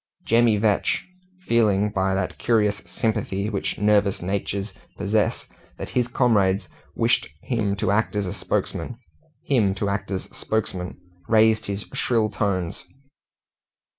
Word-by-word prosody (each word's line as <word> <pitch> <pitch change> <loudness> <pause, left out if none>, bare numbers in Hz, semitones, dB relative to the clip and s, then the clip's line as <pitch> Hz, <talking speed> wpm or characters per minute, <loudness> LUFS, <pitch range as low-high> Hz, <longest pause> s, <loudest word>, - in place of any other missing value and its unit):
Jemmy 115 -1 +4
Vetch, 105 -1 +1 0.4
feeling, 105 -3 +3
by 95 -1 +1
that 95 -1 -2
curious 105 -3 +2
sympathy 105 -2 -1
which 100 - -2
nervous 105 -1 +3
natures 100 +2 -3 0.2
possess, 105 +1 0 0.3
that - - -6
his 125 -1 +1
comrades 100 -7 +2 0.3
wished - - +2
him 110 -5 0
to 95 - 0
act 105 +1 +1
as 105 -1 0
spokesman, 120 - -2 2.3
raised 110 -1 +4
his 100 +1 -3
shrill 110 -3 +1
tones. 95 -4 -1
105 Hz, 105 wpm, -24 LUFS, 100-110 Hz, 2.3 s, Jemmy